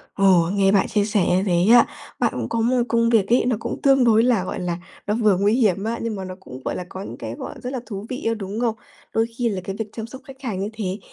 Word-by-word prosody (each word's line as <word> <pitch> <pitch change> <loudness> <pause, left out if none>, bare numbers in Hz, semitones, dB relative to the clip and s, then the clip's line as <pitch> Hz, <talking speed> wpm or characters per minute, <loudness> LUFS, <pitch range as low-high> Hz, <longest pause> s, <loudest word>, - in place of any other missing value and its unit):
Ồ, 185 -4 +4
nghe 195 -1 +3
bạn 195 -1 +3
chia 205 0 +1
sẻ 205 -4 +1
như 185 +2 +2
thế 175 -3 +2
á, 240 - +8 0.3
bạn - - +1
cũng - - -3
có 230 - -1
một 245 +2 +2
công 230 -1 +2
việc 220 -5 +3
ấy, 240 +3 +3
nó 250 -2 +2
cũng - - -5
tương 270 -2 +5
đối 225 -1 +5
là, 235 -6 +2
gọi 185 - -4
là, 175 -2 -2 0.3
nó 210 - +1
vừa 215 -5 +3
nguy 200 +3 +2
hiểm 210 -6 +2
á, 230 +2 -2
nhưng 230 -2 -2
mà 195 - -5
nó 185 0 -7
cũng, 130 -9 -10
gọi - - -2
là, 180 - -5
có 190 - -7
những 120 - -8
cái, 115 -1 -6
gọi, - - -7
rất 250 +2 -4
là 260 - -2
thú 200 -2 -6
vị 255 +2 -5
á, 230 - +2
đúng 205 0 -5
không? 235 -2 0 0.4
Đôi 225 - +2
khi 240 -2 +1
là 195 -3 -3
cái 195 - -5
việc 220 -1 -3
chăm 225 -1 -5
sóc 260 +3 -10
khách 270 -1 -13
hàng 225 -8 -3
như 200 +2 -2
thế 200 -2 -3
210 Hz, 295 wpm, -22 LUFS, 190-235 Hz, 0.4 s, á